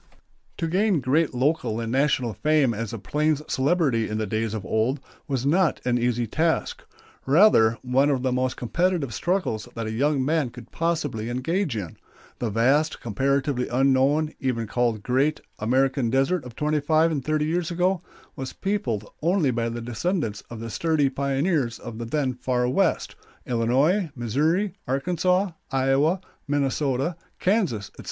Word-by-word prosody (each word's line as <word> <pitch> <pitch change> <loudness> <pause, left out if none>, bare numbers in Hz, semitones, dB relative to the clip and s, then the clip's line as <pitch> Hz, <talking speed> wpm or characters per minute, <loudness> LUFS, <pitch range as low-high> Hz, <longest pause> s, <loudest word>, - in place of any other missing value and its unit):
To 165 - -2
gain 190 +1 +2
great 140 +5 +2
local 130 -3 0
and 115 -1 -3
national 130 -3 +1
fame 140 +3 +2
as 115 -1 -4
a 115 - -4
plains 150 +9 0
celebrity 135 -5 +1
in 110 - -2
the 110 - -1
days 110 +2 -2
of 105 -3 -5
old 115 +8 0 0.3
was 135 -2 -1
not 170 +4 +2
an 125 -1 +2
easy 120 0 0
task; 165 - 0 0.5
rather 135 - +5
one 130 +3 +2
of 135 -3 0
the 130 - +1
most 130 0 0
competitive 165 +1 0
struggles 175 - -1
that 115 -1 -3
a 110 - -3
young 135 +3 +1
man 155 -3 +1
could 120 -1 -13
possibly 150 -9 -1
engage 140 - -1
in. 90 -6 -6 0.4
The 120 - -1
vast, 135 +9 +2
comparatively 135 +3 0
unknown, 135 +4 +2
even 125 -4 -1
called 115 -2 0
great, 135 +6 +1 0.2
American 130 +2 +1
Desert 135 +5 +1
of 120 -2 -10
twenty 150 0 0
five 155 +3 +3
and 145 -4 -2
thirty 155 +1 0
years 165 +1 -1
ago 180 +1 +1 0.3
was 130 -1 -6
peopled 125 - -2
only 165 -4 +2
by 115 -1 -1
the 120 0 -5
descendants 120 - -2
of 115 - -7
the 115 0 -6
sturdy 155 -2 +1
pioneers 140 -1 0
of 115 - -8
the 115 - -4
then 130 +1 -1
far 125 0 -1
West 125 - +1 0.3
Illinois, 135 - +2
Missouri, 155 - 0
Arkansas, 180 +7 +1 0.2
Iowa, 135 +7 +2 0.3
Minnesota, 140 +2 0 0.2
Kansas, 180 - 0
etc. - - -24
135 Hz, 160 wpm, -25 LUFS, 120-155 Hz, 0.5 s, rather